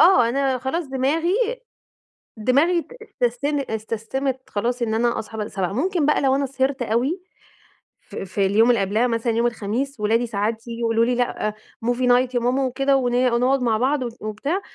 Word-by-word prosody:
آه، 345 -10 +6
أنا 270 0 0
خلاص 265 +7 -2
دماغي 290 +7 0 1.0
دماغي 285 +10 +2 0.4
اتستن 280 +5 +1
اتسستمت 230 +5 -3
خلاص 240 +4 -1
إن 220 -2 0
أنا 235 +1 +1
أصحى 220 0 -7
ب 210 0 -3
07:00 190 -2 -2
ممكن 320 - 0
بقى 300 - +3
لو 270 -1 +3
أنا 275 0 0
سهرت 265 0 -1
أوي 250 - 0 0.8
ف - - -14
في 195 +1 -1
اليوم 220 +5 +4
اللي 235 -5 +3
قبلها 215 +6 +1
مثلًا 230 0 0
يوم 235 +1 +2
الخميس 240 +4 -3
ولادي 225 +3 +1
ساعات 220 +2 -2
ييجوا 230 0 -6
يقولوا 230 0 +2
لي 245 +1 +1
لأ 240 -3 -1 0.3
movie 245 +1 +1
night 250 +1 +3
يا - - +3
ماما 255 +3 +1
وكده 270 +2 +2
ون 245 -2 0 0.2
ونقعد 255 +3 +2
مع 230 -3 +2
بعض 260 +4 +1
و 240 - -3
وبتاع 245 - -2
245 Hz, 180 wpm, -22 LUFS, 225-270 Hz, 1.0 s, آه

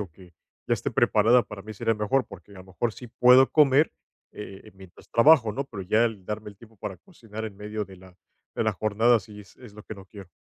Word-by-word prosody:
o 95 -5 -6
que 90 0 -18 0.3
ya - - +2
esté - - -4
preparada, 115 +3 +3
para 100 -2 -10
mí 110 - -9
sería 115 +2 -1
mejor. 105 +4 0
Porque, 100 0 -14
a - - -14
lo 95 - -12
mejor, 105 +5 -3
sí 125 - -11
puedo 125 +2 +5
comer, 150 0 +4 0.4
eh, 95 -2 -10
mientras 95 -2 -16
trabajo, 120 -2 +5
¿no? 135 +6 -4
Pero 105 -7 -8
ya 110 +5 +2
el 105 -5 -4
darme 105 0 -5
el 100 - -19
tiempo 110 -1 -18
para 95 -2 -7
cocinar, 110 - -9
en 100 -2 -10
medio 105 0 -5
de 95 0 -14
la 95 0 -17 0.4
de - - -1
la - - +1
jornada, 110 +3 +2
sí 105 +1 -13
es 100 - -18
es 120 -5 -14
lo 105 +1 -12
que 110 - -9
no 95 -1 -13
quiero. 95 -2 -13
105 Hz, 240 wpm, -25 LUFS, 95-120 Hz, 0.4 s, puedo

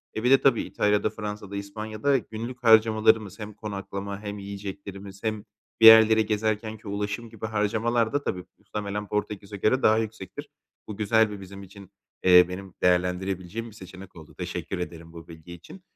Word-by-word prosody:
E, 110 - -3
bir 125 - +3
de 135 -1 +6
tabii 135 - +3
İtalya’da, 105 +1 0
Fransa’da, 105 -2 -7
İspanya’da 110 +6 -1
günlük 120 +1 -7
harcamalarımız 110 -2 +4
hem 105 0 -7
konaklama 100 -1 -6
hem 105 0 -6
yiyeceklerimiz 100 0 -8
hem 110 -2 -2 0.4
bir - - +7
yerleri 110 0 +8
gezerkenki 110 0 -2
ulaşım 105 +3 -4
gibi 110 -1 -8
harcamalar 110 +2 0
da 145 - +1
tabii 90 -7 -3
muhtemelen 105 0 -5
Portekiz’e 105 -1 -4
göre 120 +7 +1
daha 110 0 +5
yüksektir. 110 -4 -5 0.4
Bu 105 - -7
güzel 110 +1 +3
bir 100 -1 -8
bizim 100 +1 -10
için, 100 0 -14 0.3
eee, 90 -1 +8
benim 95 0 -8
değerlendirebileceğim 90 +4 0
bir 110 - -16
seçenek 95 -1 -12
oldu. 80 -3 -13
Teşekkür 95 - -5
ederim 85 -1 -7
bu 85 -1 -11
bilgi 80 +1 -12
için. 90 - -13
105 Hz, 160 wpm, -26 LUFS, 95-110 Hz, 0.4 s, yerleri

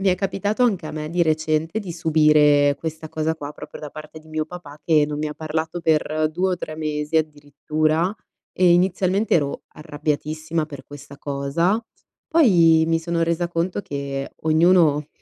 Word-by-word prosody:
mi 195 - +2
è 180 - +4
capitato 205 +5 0
anche 190 -9 0
a - - -5
me 155 0 -5
di 175 +1 +1
recente 155 +3 0
di 190 -5 -6
subire 150 -3 +4
questa 160 -1 -6
cosa 160 +1 -1
qua, 145 -1 -7
proprio - - -10
da 150 -2 -7
parte 155 +1 -10
di 155 0 -18
mio 155 0 -2
papà, 150 -4 -11
che 155 -3 +4
non 150 0 -4
mi 155 0 -2
ha 150 - -7
parlato 160 +2 -3
per 155 -1 +1
2 185 +3 0
o 180 - -1
3 155 -2 -6
mesi, 150 0 -2
addirittura 155 +3 0 0.4
e 180 -1 +5
inizialmente 185 +3 +2
ero 145 -4 0
arrabbiatissima 155 +1 -3
per 140 -3 -10
questa 145 0 -12
cosa, 145 +9 0 0.5
poi 170 - +5
mi 165 0 +2
sono 170 0 -1
resa 170 +1 0
conto 175 +3 -2
che 140 -4 -5
ognuno 160 -2 +4
155 Hz, 175 wpm, -22 LUFS, 150-170 Hz, 0.5 s, e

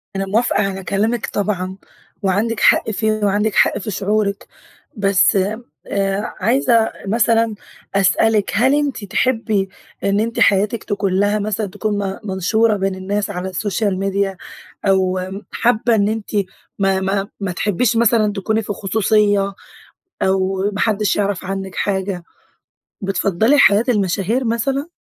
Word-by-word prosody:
أنا 195 0 -1
موافقة 220 +5 +1
على 195 -1 -3
كلامِك 215 +5 0
طبعًا 190 -2 -2 0.4
وعندِك 210 +4 0
حق - - +4
فيه، 220 +1 0
وعندِك 205 +1 +1
حق - - +4
في 215 - -5
شعورِِك. 200 +1 -1 0.5
بس، 195 -1 +3 0.5
آآ، 195 +1 -1
عايزة 230 +1 +2 0.2
مثلًا 225 +1 +2 0.4
أسألِك 200 +2 +2
هل 260 +6 +4
أنتِ 290 -6 -1
تحبِّي 215 -2 0 0.3
إن 200 +1 +2
أنتِ 230 +2 -2
حياتِك 205 +3 +2
تكون 200 -2 -1
لها 205 +1 +2
مثلًا 210 0 -2
تكون 210 +2 -3
م 190 - -7
منشورة 210 +3 +1
بين 195 -1 -1
الناس 200 +2 -2
على 185 -1 -4
السوشيال 200 +1 -1
ميديا؟ 195 -1 -1 0.5
أو 185 -1 +2 0.3
حابة 235 0 +2
إن 200 -2 +2
أنتِ 220 -1 -4 0.5
ما 195 -1 +2
ما 195 +1 -1
ما 195 -3 -2
تحبّيش 210 +6 0
مثلًا 225 -2 +3
تكوني 215 +2 -1
في 205 -1 -4
خصوصية 205 -1 +1 0.7
أو 190 +1 +1
ما 200 - -5
حدش 210 -2 +1
يعرف 200 -3 -1
عنِك 190 0 -5
حاجة؟ 190 -2 -2 0.8
بتفضّلي 195 +6 +2
حياة 205 -4 +5
المشاهير 205 +3 0
مثلًا؟ 265 +6 -1
205 Hz, 135 wpm, -19 LUFS, 195-220 Hz, 0.8 s, حياة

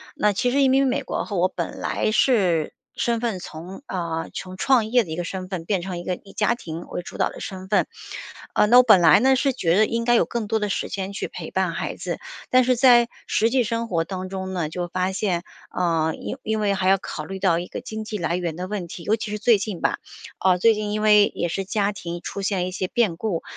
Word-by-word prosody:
那 210 -1 +2
其 245 +6 +1
实 280 +2 +2
移 270 - +5
民 270 +1 +4
美 270 +2 0
国 260 - -3
后， 205 - -4
我 180 +1 +4
本 - - -5
来 - - -1
是 190 - +2 0.2
身 235 -1 0
份 225 -6 -2
从 175 - -9
呃， 170 -3 -3
从 185 -1 -6
创 250 +1 +3
业 245 +1 +3
的 175 - -12
一 - - -2
个 175 - -3
身 185 +1 -5
份 180 -4 -4
变 190 -1 0
成 180 0 -5
一 - - -7
个 180 - -2
以 195 +2 -16
家 215 +2 +2
庭 165 -8 -7
为 - - -4
主 175 - -10
导 - - +2
的 - - -10
身 190 -1 -7
份。 205 - +2 0.7
呃， - - +5
那 240 +4 +6
我 250 - +9
本 215 -7 +6
来 165 - +7
呢， 265 +3 +4
是 270 +1 +1
觉 180 -7 +1
得 215 - +5
应 230 +2 -1
该 240 +1 +3
有 - - +4
更 235 -3 -3
多 220 +1 +1
的 210 - -1
时 - - -2
间 195 0 -4
去 - - -3
陪 - - -8
伴 - - 0
孩 - - -3
子， - - -4 0.3
但 255 0 +5
是 250 +1 +3
在， 240 -1 +6 0.2
实 225 - +2
际 255 -1 +3
生 230 +1 -2
活 170 -6 0
当 185 +1 -5
中 190 0 -5
呢， 175 -4 -1
就 175 +2 -4
发 185 +2 -1
现， 185 -3 -1 0.3
啊， 165 -3 0
因 - - -6
因 220 -2 -1
为 205 -2 +1
还 190 -1 +1
要 195 - +5
考 160 -4 -6
虑 195 +4 -6
到 185 -3 +2
一 175 - -5
个 - - -6
经 220 0 -6
济 215 0 -4
来 170 -2 -1
源 175 -3 -2
的 180 +2 -5
问 195 -3 -4
题。 170 0 -9
尤 215 - +2
其 220 -1 -5
是 210 - -3
最 220 0 +4
近 200 -3 -4
吧， - - 0 0.4
啊， 185 -1 +3
最 225 +5 +5
近 210 -1 -3
因 210 0 -1
为 210 -1 +6
也 175 - -1
是 195 +3 -3
家 205 0 0
庭 175 -4 -6
出 200 - -5
现 195 -2 0
一 - - -5
些 185 0 -2
变 210 -4 +1
故， 180 -2 -2
195 Hz, 285 characters per minute, -23 LUFS, 180-225 Hz, 0.7 s, 我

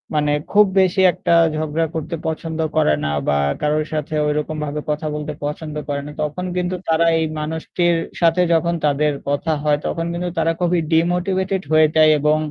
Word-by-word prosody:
মানে 150 -1 +1 0.2
খুব 210 +1 +6
বেশি 190 0 +3
একটা 170 - 0 0.2
ঝগড়া 155 +1 -1
করতে 160 +1 -3
পছন্দ 160 0 -4 0.2
করে 155 - +3
না, - - 0 0.2
বা 75 - +2 0.3
কারোর 150 +1 +1
সাথে 155 0 -3
ঐরকম 150 +1 -2
ভাবে 150 +1 -4
কথা 150 +1 -2
বলতে 150 0 -4
পছন্দ 150 +1 -5
করে 140 -1 -2
না। - - -7
তখন 150 +5 -4
কিন্তু 180 0 -1
তারা 165 +1 +3
এই 160 - +1
মানুষটির 160 +3 -1 0.3
সাথে 170 +1 +4
যখন 170 +1 +2
তাদের 150 +1 +2 0.2
কথা 145 +3 -1
হয়, 150 -1 +2
তখন 165 - -2
কিন্তু 175 +1 -3
তারা 165 0 +2
খুবই 175 -1 +1
ডিমোটিভেটেড 185 +3 +1
হয়ে 155 0 +6
যায় 155 0 +6
এবং 150 +1 +2
160 Hz, 180 wpm, -20 LUFS, 150-170 Hz, 0.3 s, খুব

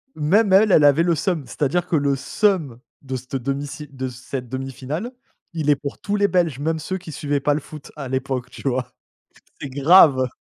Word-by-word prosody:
même 190 +7 +2
elle, 205 +2 +6
elle 155 - +6
avait 145 +3 +5
le 170 -1 +2
seum. 165 -1 -1
C'est-à-dire 160 +5 -1
que 175 - 0
le 140 -2 +2
seum 155 - 0 0.2
de 130 -1 -5
cette 130 +1 -7
1/2 135 +2 -2
si 150 +1 -8
de 130 -2 -5
cette 125 0 -7
1/2 135 +1 -4
finale, 150 - -5 0.4
il 155 -3 -1
est 145 - +6
pour 140 0 -7
tous 205 - -2
les 205 0 +3
Belges 170 -7 0
même 160 +2 -1
ceux 185 +5 -4
qui 175 -3 -10
suivaient 145 -1 -2
pas 145 +1 +1
le 145 - -1
foot 150 0 -12
à 140 -3 -6
l'époque 130 -1 -3
tu - - -7
vois? 125 -1 -2 0.7
C'est 145 - -5
grave. 140 -1 +5
145 Hz, 215 wpm, -22 LUFS, 135-170 Hz, 0.7 s, elle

